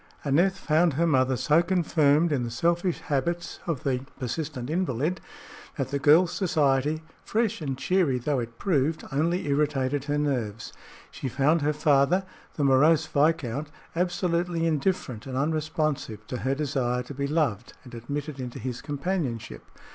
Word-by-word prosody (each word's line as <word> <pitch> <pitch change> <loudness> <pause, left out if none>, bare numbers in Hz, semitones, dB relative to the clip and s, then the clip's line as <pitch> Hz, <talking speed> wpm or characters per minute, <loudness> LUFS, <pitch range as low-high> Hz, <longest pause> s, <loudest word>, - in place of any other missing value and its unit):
Aneth 175 +7 +3
found 165 -1 +2
her 165 +5 +1
mother 130 -4 +2
so 150 +6 +4
confirmed 165 -3 +2
in 140 -4 +1
the 120 - -2
selfish 170 +8 0
habits 170 +5 -2
of 160 -7 -2
the 130 -3 0 0.2
persistent 130 0 -4
invalid, 160 0 -1 0.6
that - - -2
the 140 - -1
girl's 160 +5 +5
society, 155 -4 +1 0.2
fresh 225 -2 0
and 135 -4 -3
cheery 160 -2 +1
though 135 +2 -1
it 115 -1 -6
proved, 160 -4 0
only 165 +6 0
irritated 140 -1 0
her 145 0 0
nerves. 120 -7 -2 0.4
She 135 - -5
found 150 +6 +2
her 150 +1 +2
father, 150 +4 +3 0.3
the 150 - -1
morose 150 +4 +4
viscount, 150 -2 0 0.3
absolutely 175 -1 0
indifferent 150 - -1
and 130 -1 -4
unresponsive 155 -7 -1
to 125 - -4
her 130 +2 -1
desire 130 -4 -1
to 135 - -9
be 140 +1 -2
loved 145 -9 -1
and 125 - -13
admitted 140 +5 -5
into 125 -2 -5
his 125 -2 -5
companionship. 140 - -3
145 Hz, 150 wpm, -26 LUFS, 130-165 Hz, 0.6 s, girl's